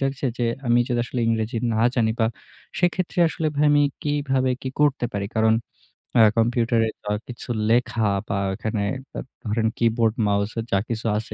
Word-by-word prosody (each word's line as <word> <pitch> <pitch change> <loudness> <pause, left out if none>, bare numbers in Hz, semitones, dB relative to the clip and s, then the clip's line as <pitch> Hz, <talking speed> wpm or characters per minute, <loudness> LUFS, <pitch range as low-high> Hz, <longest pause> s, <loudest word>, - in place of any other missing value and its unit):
জাগছে 135 0 -1
যে 120 - +1 0.2
আমি 120 +1 +4
যদি 120 -1 +1
আসলে 125 0 -4
ইংরেজি 110 0 0 0.2
না - - 0 0.2
জানি 110 -3 +2
বা, 110 - +4 0.5
সেক্ষেত্রে 180 0 0
আসলে 160 0 -3
ভাই 150 +1 +3
আমি 145 0 +5 0.2
কীভাবে 135 -3 0
কি 130 - -3
করতে 140 -4 +2
পারি? 100 0 -1
কারণ 110 0 +4 0.6
অ্যা 115 - +7
কম্পিউটারে 115 -1 +2 0.2
দা 105 - -3 0.2
কিছু 125 0 -9 0.2
লেখা 115 -1 +2 0.2
বা, 100 - -2 0.2
এখানে 110 -1 -2 0.3
দা - - -4 0.3
ধরেন 110 +1 +1
কিবোর্ড, 115 -1 +2
মাউসে 100 +3 0
যা 100 - +3
কিছু 115 0 -3
আছে, 110 0 -5
115 Hz, 170 wpm, -23 LUFS, 110-130 Hz, 0.6 s, অ্যা